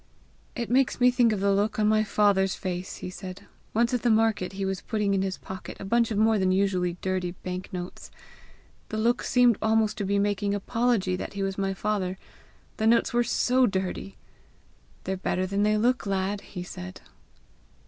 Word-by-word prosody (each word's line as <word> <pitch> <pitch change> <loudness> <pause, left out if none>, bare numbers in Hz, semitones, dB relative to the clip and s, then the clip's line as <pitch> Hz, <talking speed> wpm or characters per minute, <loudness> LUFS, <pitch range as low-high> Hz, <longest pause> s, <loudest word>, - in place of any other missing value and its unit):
"It 235 -2 -3
makes 260 0 +2
me 250 0 +6
think 245 -2 +3
of 205 -3 -1
the 200 0 +3
look 205 +2 0
on 210 -1 +2
my 215 0 +3
father's 200 -2 +2
face," 180 -1 -4
he 185 - -5
said, 185 0 -8 0.3
"once 235 +2 +1
at 245 - +1
the 240 - +2
market, 220 -4 +2
as 195 - -12
he 195 - -1
was 190 -1 -2
putting 210 -3 -1
in 195 - +1
his 190 -1 -2
pocket 190 -1 -8
a - - -6
bunch 235 +3 +2
of 215 - -2
more 220 0 +3
than 185 -1 +2
usually 185 -2 +1
dirty 185 -2 -1
bank 180 0 -5
notes. 180 -1 -7 0.8
The 215 - -3
look 235 +3 +2
seemed 245 -4 +3
almost 220 0 +2
to - - -1
be 200 +1 +1
making 205 0 0
apology 210 -2 0
that - - -6
he 200 -1 -3
was 195 0 -2
my 195 0 -1
father 190 -3 -1 0.6
the 220 - +1
notes 235 +1 +3
were 240 0 +3
SO 250 +1 +2
DIRTY! 190 0 -3 0.9
'They're 190 0 -2
better 185 0 -1
than 200 +2 -1
they 210 +1 +3
look, 245 +1 +1
lad!' 195 +1 -1
he 180 -3 -7
said." 90 - -9
200 Hz, 200 wpm, -27 LUFS, 190-220 Hz, 0.9 s, me